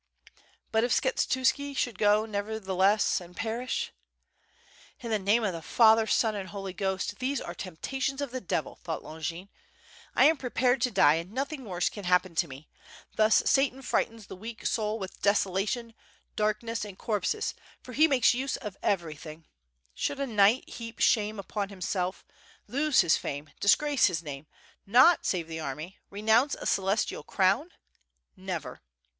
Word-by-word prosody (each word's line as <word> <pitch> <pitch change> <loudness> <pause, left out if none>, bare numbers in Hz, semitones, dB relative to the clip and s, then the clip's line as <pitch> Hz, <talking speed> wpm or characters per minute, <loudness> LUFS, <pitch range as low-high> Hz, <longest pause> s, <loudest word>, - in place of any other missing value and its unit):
But 220 0 +2
if 240 - 0
Skshetuski 265 +2 0
should 240 -8 -1
go 210 +1 +4
nevertheless, 205 -2 +1
and 175 0 -13
perish: 250 - -2 1.1
"In 235 -2 -6
the 215 - +2
name 205 +4 +2
of 200 -4 0
the 165 - -6
Father, 220 +4 +5
Son, 220 0 +2
and 195 -3 -5
Holy 195 -2 -6
Ghost! 190 +1 -2
these 260 +1 -1
are - - -6
temptations 265 - -4
of 285 -3 -3
the 255 0 -4
devil," 185 - -3
thought 165 -2 -4
Longin. 165 +4 -6 0.6
"1 - - +5
am 320 +1 +5
pre 255 -2 -5
pared 250 +1 +2
to 250 - +2
die 190 -9 +5
and 175 +3 -13
nothing 270 +2 -4
worse 180 -3 -1
can 205 -3 -6
happen 180 0 +2
to 170 +1 +1
me. 135 +2 -11 0.5
Thus 215 0 +4
Satan 270 -1 +2
frightens 225 -3 -1
the - - -9
weak 225 +4 -9
soul 215 -1 0
with 190 -3 -8
desolation, 205 +4 0 0.4
darkness, 215 +1 -1
and 200 -3 -8
corpses, 225 - -1 0.3
for 250 - -10
he 310 +6 +5
makes 270 -5 +4
use 265 +2 -2
of 210 -5 -7
everything. 160 -3 -3 0.5
Should 280 - -2
a 275 - 0
knight 215 0 +3
heap 230 -1 -8
shame 215 -1 +2
upon 200 0 -4
himself, 185 -1 -3 0.4
lose 285 +2 +3
his 170 -3 +3
fame, 145 +1 -6
disgrace 285 +7 +4
his 170 -3 -2
name, 145 -1 -7 0.4
not 255 - +6
save 175 -4 -1
the 160 0 -6
army, 155 +5 -6
renounce 220 +7 +2
a - - -9
celestial 195 +2 0
crown? - - +1 0.7
Never!" - - -6
210 Hz, 160 wpm, -28 LUFS, 185-245 Hz, 1.1 s, not